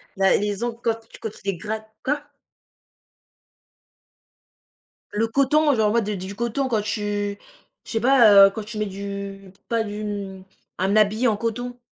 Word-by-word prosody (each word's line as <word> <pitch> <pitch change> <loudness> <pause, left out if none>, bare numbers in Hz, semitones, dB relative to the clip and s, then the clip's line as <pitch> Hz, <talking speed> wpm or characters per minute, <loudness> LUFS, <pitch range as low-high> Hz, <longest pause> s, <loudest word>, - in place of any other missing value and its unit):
la 195 0 +4
les 205 +1 -2
ongles 235 -1 -3
quand, 230 -1 +2
tu - - -13
quand 220 - -5
tu - - -16
les 195 -3 -1
grattes 220 +3 -5
Quoi? 290 +1 -2 2.8
Le 220 +2 0
coton, 280 +5 +3
genre, 215 -2 +2
ouais, 235 +1 +3
de 210 +1 -2
du 190 +1 -6
coton 235 +4 -1
quand 225 -4 +1
tu 205 -1 -2 0.4
je - - -11
sais 225 - 0
pas, 240 -2 +6 0.2
heu, - - +1
quand 215 +2 -6
tu 215 +1 -8
mets 215 - 0
du 200 0 -7 0.2
pas 230 -1 +1
du 210 0 -6
hem, 200 -2 -5 0.3
un 190 +3 +1
habit 215 +3 +3
en 220 - +2
coton. 245 +2 -4
215 Hz, 170 wpm, -23 LUFS, 200-235 Hz, 2.8 s, pas